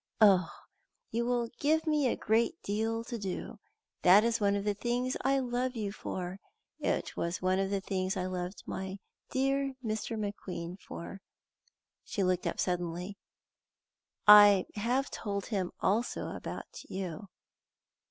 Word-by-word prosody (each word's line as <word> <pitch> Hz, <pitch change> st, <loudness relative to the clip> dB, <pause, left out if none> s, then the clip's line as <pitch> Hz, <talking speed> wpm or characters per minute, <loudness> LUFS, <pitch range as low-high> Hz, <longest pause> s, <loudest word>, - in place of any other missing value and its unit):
Oh, 195 Hz, -5 st, +6 dB, 0.6 s
you 235 Hz, +1 st, 0 dB
will 240 Hz, -1 st, +1 dB
give 315 Hz, +3 st, +2 dB
me 300 Hz, -4 st, +2 dB
a -, -, +1 dB
great 235 Hz, +10 st, +1 dB
deal 225 Hz, +3 st, -1 dB
to 235 Hz, 0 st, -5 dB
do! 205 Hz, +3 st, -5 dB, 0.4 s
That 195 Hz, +4 st, +7 dB
is 230 Hz, 0 st, +1 dB
one 200 Hz, 0 st, +3 dB
of 200 Hz, -, -1 dB
the 205 Hz, 0 st, +1 dB
things 245 Hz, +4 st, -1 dB
I 275 Hz, +1 st, +3 dB
love 250 Hz, 0 st, -1 dB
you 210 Hz, -3 st, -2 dB
for. 185 Hz, -2 st, -5 dB, 0.4 s
It -, -, -1 dB
was 170 Hz, +1 st, -2 dB
one 185 Hz, +1 st, +1 dB
of 195 Hz, 0 st, 0 dB
the 200 Hz, -1 st, -1 dB
things 190 Hz, 0 st, -1 dB
I 180 Hz, -, -1 dB
loved 180 Hz, +1 st, -4 dB
my 190 Hz, +1 st, -4 dB, 0.3 s
dear 270 Hz, +1 st, 0 dB
Dr. 220 Hz, +1 st, -2 dB
McQueen 190 Hz, -4 st, -5 dB
for." 195 Hz, +3 st, -8 dB, 0.8 s
She 200 Hz, -, -2 dB
looked 185 Hz, -1 st, +1 dB
up -, -, -3 dB
suddenly. 180 Hz, +2 st, -2 dB, 1.1 s
"I 205 Hz, -2 st, +9 dB
have 245 Hz, +6 st, 0 dB
told 200 Hz, -2 st, -3 dB
him 190 Hz, -6 st, -2 dB
also 225 Hz, +5 st, 0 dB
about -, -, -7 dB
you." 190 Hz, +1 st, -5 dB
205 Hz, 145 wpm, -31 LUFS, 190-235 Hz, 1.1 s, I